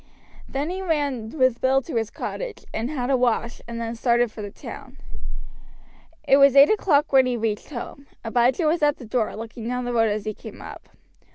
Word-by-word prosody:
Then 285 +5 -2
he 375 +1 -4
ran 285 -10 -1
with 255 -3 +1
Bill 265 +1 +4
to 305 - -7
his 225 -1 0
cottage - - -6
and 230 +3 -2
had 270 -3 -2
a - - +4
wash, 240 -1 0
and 235 0 -5
then 230 0 -3
started 235 0 +2
for 215 - -9
the 205 - -5
town. - - -10 1.3
It 275 - +6
was 275 -1 +6
eight 280 +5 +8
o'clock 305 -9 +2
when 265 -1 +6
he 245 -1 -1
reached 215 -2 -2
home. 280 +1 -8 0.2
Abijah 245 +7 +2
was 315 +2 +2
at 295 -1 +3
the 250 - -10
door, 225 0 -1
looking 225 +1 -7
down 250 0 -2
the 245 - -2
road 225 -2 +3
as 210 0 -2
he 215 - -2
came - - -11
up. - - -10
250 Hz, 205 wpm, -24 LUFS, 230-280 Hz, 1.3 s, eight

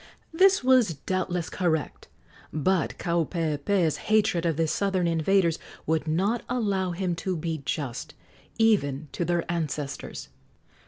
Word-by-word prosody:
This 380 +1 +5
was 250 -9 +4
doubtless 180 +2 -2
correct; 160 -4 -2 0.4
but 170 +4 0
Kaupeepee's 165 0 0
hatred 205 -6 +3
of 160 -3 0
the 165 - +2
southern 190 +1 0
invaders 170 +1 +2 0.3
would 160 0 0
not 195 +9 +1
allow 200 -7 0
him 180 0 -1
to 185 +2 -2
be 160 -1 -3
just, 140 -7 -4 0.4
even 155 -11 +2
to - - -2
their 175 0 0
ancestors. 155 -4 -4
175 Hz, 120 wpm, -26 LUFS, 160-195 Hz, 0.4 s, This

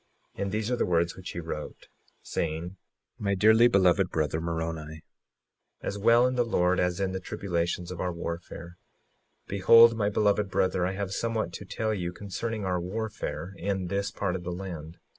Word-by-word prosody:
56:2 - - -7
And 100 -1 -1
these 110 +2 -1
are - - +3
the - - 0
words 85 -1 +1
which 95 - -8
he - - -5
wrote, 80 -2 -6 0.4
saying: 85 +3 -3 0.4
My 100 -1 0
dearly 110 +5 +6
beloved 95 -3 +3
brother, 80 0 -1
Moroni, 80 -2 -4 0.8
as - - -3
well 115 +3 +5
in 125 - +1
the 125 -1 +2
Lord 90 -5 +2
as 90 0 0
in 95 -1 0
the 95 - -3
tribulations 85 -1 -2
of 90 - -5
our 90 - -1
warfare; 85 0 -6 0.7
behold, 115 +4 +7
my 105 -2 +1
beloved 105 -1 +2
brother, 90 -1 +1
I 95 - -2
have 95 -1 -3
somewhat 110 -4 -1
to 100 - -7
tell 110 +3 -2
you 90 -4 -3
concerning 105 +3 -4
our 90 -1 0
warfare 95 -3 -4
in 95 -1 -2
this 100 +1 -1
part 95 -3 -2
of 90 - -4
the 90 0 -4
land. 85 -3 -7
95 Hz, 180 wpm, -28 LUFS, 85-105 Hz, 0.8 s, behold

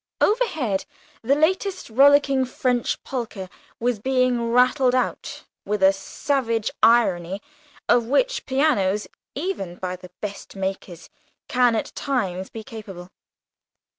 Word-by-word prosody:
Overhead, 315 - +1 0.4
the 265 +5 +2
latest 370 +5 0
rollicking 275 +1 +5
French 250 -1 -1
polka 230 -7 -5 0.3
was 240 -2 0
being 255 -1 +1
rattled 255 +1 +4
out, 255 - -2 0.2
with 205 -1 -2
a 190 +1 +7
savage 230 +2 -1
irony 195 -6 +3 0.5
of 240 -1 +3
which - - +1
pianos, 250 -8 +1 0.3
even 275 - -3
by 180 0 -4
the 180 0 -13
best 205 -1 -7
makers, 190 -3 -5 0.4
can 245 -2 +3
at 220 - -3
times 190 -9 -2
be 225 - -8
capable. 205 -7 -10
240 Hz, 115 wpm, -23 LUFS, 195-270 Hz, 0.5 s, a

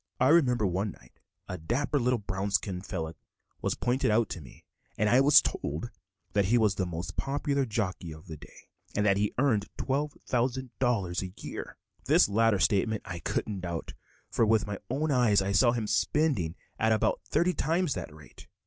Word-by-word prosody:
I 130 - +4
remember 125 -9 +4
one 95 +2 -1
night - - -22 0.3
a - - -5
dapper 135 - 0
little 125 0 +2
brown 100 -1 -3
skin 95 -1 -1
fellow 80 -5 -4 0.5
was - - 0
pointed 130 +2 0
out 110 +1 +2
to 85 - -6
me 65 - -15 0.3
and 105 - +2
I 125 +5 +5
was 145 +1 +7
told 75 +12 -3 0.4
that 100 -1 +3
he 115 +6 +3
was 110 -4 +3
the 95 -2 -2
most 85 +2 -5
popular 140 -1 0
jockey 95 -6 -3
of 80 +3 -11
the 80 -4 -7
day, - - -16 0.3
and 105 - +1
that 100 -1 +4
he 105 0 0
earned 120 -7 +2
$12,000 125 -7 -1
a 95 0 -8
year. - - -7 0.3
This - - +5
latter 110 +1 +3
statement 105 +4 +1
I 85 - -5
couldn't 100 +4 -2
doubt, 85 -2 -5 0.4
for - - +2
with 110 0 +3
my 105 -2 -5
own 145 +5 0
eyes 120 -6 +4
I 95 +1 -1
saw 120 +5 +5
him 115 -2 -2
spending 105 - +1 0.2
at 110 0 +2
about 110 - +1
thirty 180 +1 +2
times 165 0 0
that 90 -4 -6
rate. 75 -2 -15
105 Hz, 185 wpm, -29 LUFS, 95-125 Hz, 0.5 s, was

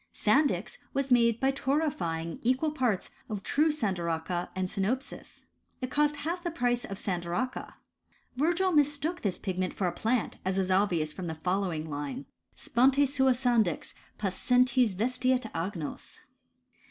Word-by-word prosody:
Sandy 270 +3 +3
X 200 +8 -6 0.2
was 275 -1 -1
made 235 -2 +4
by 270 0 +3
torrefying 225 - -1
equal 260 +6 +1
parts 250 -10 0 0.2
of 205 -3 -4
true 305 +7 +3
sandaracha 175 - -2
and 185 0 -1
sinopis. 215 +8 -3 0.4
It 255 -1 -4
cost 295 0 +2
half 335 +5 -3
the 345 - -1
price 245 -6 0
of 195 - -6
san 180 -3 -2
daracha. 175 +9 -3 0.6
Virgil 345 +7 +2
mistook 295 +2 +2
this 190 -4 -1
pigment 185 -1 -2
for 195 - -1
a 175 - +1
plant, 230 +4 -1
as 190 +1 0
is 190 -1 +1
obvious 175 -6 +2
from 185 -2 -5
the 160 - -3
following 180 -2 -1
line: 145 -2 -4 0.3
Sponte 270 +4 +3
sua 265 -1 +3
sandix, 235 - +1 0.2
pascentes 245 +3 +2
vestiet 255 +4 +1
agnos. 165 -2 -5
230 Hz, 145 wpm, -29 LUFS, 185-270 Hz, 0.6 s, made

